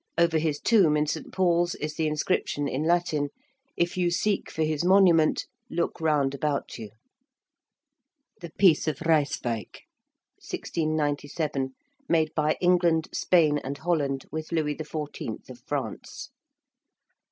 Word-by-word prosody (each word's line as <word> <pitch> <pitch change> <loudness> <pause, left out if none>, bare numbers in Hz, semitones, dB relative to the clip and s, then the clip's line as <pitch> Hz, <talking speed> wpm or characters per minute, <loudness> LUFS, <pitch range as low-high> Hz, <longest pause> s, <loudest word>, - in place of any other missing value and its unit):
Over 170 -1 +3
his 155 -2 -1
tomb 185 -10 +4
in 150 - +2
St. 155 +1 -4
Paul's 175 -2 +2
is 150 +1 -4
the 160 0 -1
inscription 150 -1 -1
in 135 +1 -2
Latin: 165 -4 +1 0.5
'If 175 +1 0
you 175 -1 +2
seek 200 +3 0
for 160 - -2
his 155 0 -1
monument, 180 -4 +4 0.2
look 170 -3 -2
round 145 -4 +2
about 140 -2 -2
you.' 110 -2 -7 1.5
~The 170 - -8
Peace 180 -7 +4
of 150 -1 -2
Ryswick~, 140 - -1 0.6
1697, 145 -3 -2 0.4
made 160 -2 +2
by 155 0 +1
England, 175 -3 +2
Spain, 155 -5 +3
and 140 +1 -5
Holland 145 -5 -1
with 155 +1 -5
Louis 155 -3 0
XIV. 155 -1 -6
of - - -12
France. - - -5
155 Hz, 130 wpm, -26 LUFS, 145-170 Hz, 1.5 s, tomb